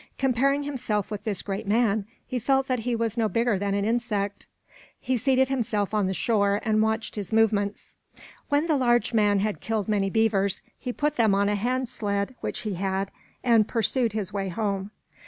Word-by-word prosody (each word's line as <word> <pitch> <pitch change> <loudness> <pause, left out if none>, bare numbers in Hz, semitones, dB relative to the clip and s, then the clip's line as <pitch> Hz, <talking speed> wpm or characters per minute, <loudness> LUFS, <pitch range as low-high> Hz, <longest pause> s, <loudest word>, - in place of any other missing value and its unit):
Comparing 275 +2 +2
himself 235 -8 -2
with 210 -1 -5
this 205 -4 -2
great 195 0 -4
man, 215 -1 +2 0.2
he 255 -1 -3
felt 270 +3 +2
that 255 -2 0
he 240 +1 -1
was 230 0 -1
no 220 -2 +2
bigger 230 0 +1
than 200 0 -1
an 200 0 0
insect. 215 -3 -1 0.5
He 260 0 -1
seated 260 +2 +2
himself 220 -6 -1
on 210 -3 +2
the 190 - -1
shore 200 +1 +2
and 215 -1 +2
watched 220 +1 0
his 205 -4 -5
movements. 210 -2 +1 0.6
When 290 +2 +2
the 315 -3 +2
large 240 -2 +2
man 205 -3 +3
had 210 0 -2
killed 220 -3 -2
many 200 -2 +1
beavers, 200 -2 +1 0.2
he 250 - -3
put 295 +3 -1
them 220 -4 +4
on 200 +1 +2
a 210 - +1
hand 250 +5 -1
sled 200 0 -2
which - - -3
he 215 -3 -3
had, 195 +1 -2 0.3
and 230 -4 +4
pursued 230 0 +1
his 210 -2 -3
way 195 -1 -2
home. 200 0 -2
220 Hz, 195 wpm, -26 LUFS, 200-240 Hz, 0.6 s, them